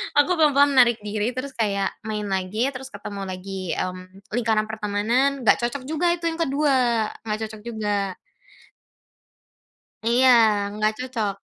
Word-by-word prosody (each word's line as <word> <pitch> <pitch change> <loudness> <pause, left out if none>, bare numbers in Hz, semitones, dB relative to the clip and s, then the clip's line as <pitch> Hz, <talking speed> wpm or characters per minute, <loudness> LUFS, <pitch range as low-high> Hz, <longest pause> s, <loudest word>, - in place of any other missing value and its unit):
Aku 290 +5 +4
pelan-pelan 285 -2 +5
menarik 235 -3 +5
diri, 210 +3 -2
terus 270 +2 -4
kayak 200 -5 -1 0.2
main 210 -1 -3
lagi, 195 +7 0
terus 260 0 -8
ketemu 200 -3 -7
lagi, 185 -1 -5
mmm, 185 +3 -6
lingkaran 220 -2 +1
pertemanan, 220 +6 0
enggak 220 - +4
cocok 255 +2 -4
juga 315 +5 -1
itu 345 - -16
yang 325 - -7
ke-2, 265 -7 +2 0.2
enggak 215 0 -1
cocok 215 -1 -11
juga. 205 -4 -2 1.9
Iya 245 +3 +4 0.4
enggak 215 +1 0
cocok. 230 -6 -2
220 Hz, 135 wpm, -23 LUFS, 205-260 Hz, 1.9 s, pelan-pelan